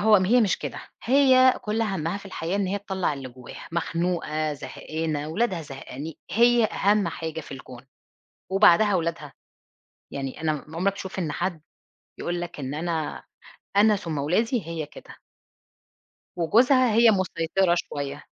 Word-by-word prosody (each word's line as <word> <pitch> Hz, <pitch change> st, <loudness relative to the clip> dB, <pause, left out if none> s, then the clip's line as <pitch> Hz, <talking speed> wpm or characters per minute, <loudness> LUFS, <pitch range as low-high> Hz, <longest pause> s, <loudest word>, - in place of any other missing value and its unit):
هو 210 Hz, -1 st, +6 dB
م 185 Hz, -, +1 dB
هي 240 Hz, +6 st, +4 dB
مش 205 Hz, -4 st, +2 dB
كده -, -, -5 dB, 0.2 s
هي 260 Hz, 0 st, +5 dB
كُلّ 220 Hz, 0 st, -1 dB
همّها 190 Hz, -4 st, -2 dB
في 200 Hz, -, -12 dB
الحياة 180 Hz, 0 st, -3 dB
إن 200 Hz, -2 st, 0 dB
هي 200 Hz, +2 st, -1 dB
تطلّع 190 Hz, -5 st, -2 dB
اللي 135 Hz, -2 st, -6 dB
جواها، 125 Hz, -1 st, -11 dB
مخنوقة، 165 Hz, -3 st, -1 dB
زهقانة، 150 Hz, +2 st, -4 dB
ولادها 185 Hz, -1 st, -1 dB
زهقاني 140 Hz, +1 st, -8 dB
هي 235 Hz, +1 st, +4 dB
أهم 205 Hz, -3 st, +2 dB
حاجة 160 Hz, -1 st, -5 dB
في 145 Hz, -, -11 dB
الكون، 130 Hz, -1 st, -11 dB, 0.7 s
وبعدها 200 Hz, +1 st, +5 dB
ولادها، 165 Hz, -4 st, -2 dB, 0.8 s
يعني 135 Hz, +1 st, -5 dB
أنا 155 Hz, -1 st, +1 dB, 0.2 s
م 160 Hz, -, -9 dB
عُمرك 190 Hz, +3 st, +1 dB
تشوف 190 Hz, -1 st, -7 dB
إن 160 Hz, -5 st, -1 dB
حد 175 Hz, -2 st, -2 dB, 0.6 s
يقول 175 Hz, 0 st, -2 dB
لك 175 Hz, -4 st, -6 dB
إن 135 Hz, +2 st, -4 dB
أنا 160 Hz, -1 st, -3 dB, 0.5 s
أنا 210 Hz, 0 st, +5 dB
ثُم 165 Hz, -6 st, -4 dB
ولادي؟ 205 Hz, -, 0 dB
هي 165 Hz, -3 st, -4 dB
كده. -, -, -14 dB, 1.1 s
وجوزها 240 Hz, -, +4 dB
هي 230 Hz, 0 st, +6 dB
مُسيطرة 185 Hz, -1 st, +1 dB
شويّة. 145 Hz, -3 st, -4 dB
175 Hz, 150 wpm, -25 LUFS, 155-205 Hz, 1.1 s, هو